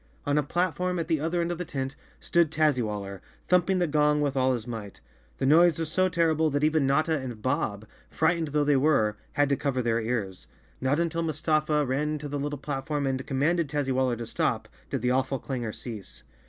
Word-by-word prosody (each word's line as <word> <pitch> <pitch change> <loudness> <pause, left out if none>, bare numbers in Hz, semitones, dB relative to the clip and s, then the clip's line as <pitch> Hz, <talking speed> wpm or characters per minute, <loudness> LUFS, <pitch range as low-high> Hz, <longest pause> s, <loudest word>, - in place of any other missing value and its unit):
On 145 - +1
a 150 - +4
platform 180 +4 -1
at 165 -2 -2
the 160 -3 +1
other 165 +3 0
end 170 +1 -1
of 175 - -4
the - - -1
tent 135 -5 -4 0.2
stood 170 -2 +2
Tazzywaller, 110 - 0 0.3
thumping 180 +1 +3
the 180 - +2
gong 150 -1 +2
with 145 -2 0
all 130 0 +3
his 115 -3 -4
might. 110 -4 -7 0.4
The - - -1
noise 165 +3 +5
was 160 -1 -3
so 185 +1 +2
terrible 160 -2 +2
that 145 0 -1
even 155 -2 +3
Notta 155 +4 +2
and 125 -4 -6
Bob, 110 -4 -1 0.2
frightened 160 0 +1
though 150 0 +1
they 145 0 +3
were, 130 -7 +2 0.2
had 145 0 +3
to 140 - +3
cover 130 -3 -1
their 115 0 +1
ears. 100 - -3 0.3
Not 135 +4 +1
until 170 0 0
Mustafa 155 -1 +1
ran 150 +4 -1
to 150 0 -6
the 145 0 -3
little 145 +1 -3
platform 145 +1 -3
and 130 -1 -2
commanded 150 +4 +1
Tazzywaller 130 -4 0
to 120 - -5
stop, - - -1 0.2
did - - -3
the 125 - +2
awful 130 +1 +1
clangor 125 -4 -4
cease. 110 -4 -8
145 Hz, 205 wpm, -27 LUFS, 130-160 Hz, 0.4 s, noise